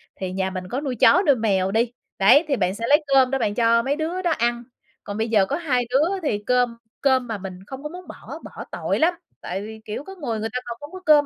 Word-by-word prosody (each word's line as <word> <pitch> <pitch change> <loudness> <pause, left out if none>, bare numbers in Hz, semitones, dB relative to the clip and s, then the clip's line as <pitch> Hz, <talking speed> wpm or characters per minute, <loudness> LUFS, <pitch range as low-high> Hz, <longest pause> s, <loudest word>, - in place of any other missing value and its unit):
thì 185 -1 -4
nhà 190 0 -1
mình 185 -1 -5
có 260 +6 -2
nuôi 270 -4 -3
chó 360 - +5
nuôi 285 - +6
mèo 195 -5 +1
đi, 230 +3 +1 0.3
đấy, 240 - +6
thì 285 - +1
bạn 185 -4 0
sẽ 230 +2 -3
lấy 295 +2 +5
cơm 265 -1 +5
đó 270 - +2
bạn 205 -4 0
cho 230 0 +3
mấy 275 +3 0
đứa 325 +4 -2
đó 350 -2 +1
ăn. 240 -3 0 0.4
Còn 205 - -6
bây 220 +1 0
giờ 210 -4 +4
có 275 - -2
2 280 -7 0
đứa 315 +10 +2
thì 210 -9 -1
cơm 245 -2 +2 0.2
cơm 260 -2 +3
mà 225 -2 -3
mình 185 -2 -8
không 265 +1 -8
có 300 - -4
muốn 360 +3 -10
bỏ, - - -9
bỏ - - -9
tội - - -1
lắm. 335 +3 +4 0.3
Tại 190 +2 -4
vì, 220 +1 -9
kiểu, 215 +5 -5
có 385 +5 -10
người, 245 - -3
người 220 +1 -2
ta 250 - 0
còn 235 -1 -6
không 290 +1 -10
có 370 - -8
cơm 295 -1 +6
245 Hz, 270 wpm, -23 LUFS, 215-290 Hz, 0.4 s, nuôi